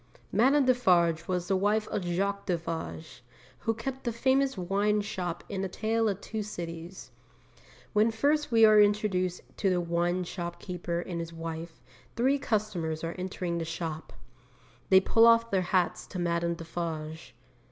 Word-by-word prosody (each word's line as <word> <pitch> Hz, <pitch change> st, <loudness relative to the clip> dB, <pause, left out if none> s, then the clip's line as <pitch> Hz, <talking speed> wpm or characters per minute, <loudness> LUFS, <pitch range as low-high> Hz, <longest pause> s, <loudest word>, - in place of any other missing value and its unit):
Madame 270 Hz, +5 st, +4 dB
Defarge 175 Hz, -10 st, +3 dB
was 180 Hz, -1 st, -1 dB
the 195 Hz, -, +2 dB
wife 210 Hz, +3 st, +1 dB
of -, -, -2 dB
Jacques 200 Hz, +3 st, -1 dB
Defarge, 160 Hz, -5 st, -4 dB, 0.4 s
who 225 Hz, -, 0 dB
kept 265 Hz, +4 st, -5 dB
the 235 Hz, -, -1 dB
famous 265 Hz, +2 st, +1 dB
wine 200 Hz, +3 st, +1 dB
shop 180 Hz, -4 st, -4 dB
in 195 Hz, -2 st, -3 dB
A -, -, 0 dB
Tale 225 Hz, +3 st, 0 dB
of 195 Hz, -1 st, -3 dB
Two 220 Hz, -1 st, -4 dB
Cities. 175 Hz, -3 st, -7 dB, 0.8 s
When 215 Hz, +1 st, +4 dB
first 285 Hz, +6 st, +1 dB
we 225 Hz, -1 st, +7 dB
are 215 Hz, -1 st, +7 dB
introduced 205 Hz, -3 st, +1 dB, 0.2 s
to 195 Hz, -, +1 dB
the 180 Hz, -1 st, +2 dB
wine 175 Hz, +1 st, 0 dB
shopkeeper 175 Hz, 0 st, -4 dB
and 175 Hz, -1 st, -5 dB
his 165 Hz, 0 st, -5 dB
wife, 165 Hz, -3 st, -7 dB, 0.3 s
three 265 Hz, +4 st, +2 dB
customers 205 Hz, -, -2 dB
are 165 Hz, +1 st, -2 dB
entering 180 Hz, -2 st, -3 dB
the -, -, -2 dB
shop. 160 Hz, -1 st, -5 dB, 0.8 s
They 190 Hz, -, +8 dB
pull 225 Hz, +4 st, +5 dB
off 230 Hz, 0 st, +5 dB
their 190 Hz, -2 st, +2 dB
hats 180 Hz, -1 st, +1 dB
to 185 Hz, -, -7 dB
Madame 170 Hz, -1 st, 0 dB
Defarge. 160 Hz, -5 st, -6 dB
185 Hz, 155 wpm, -29 LUFS, 170-215 Hz, 0.8 s, They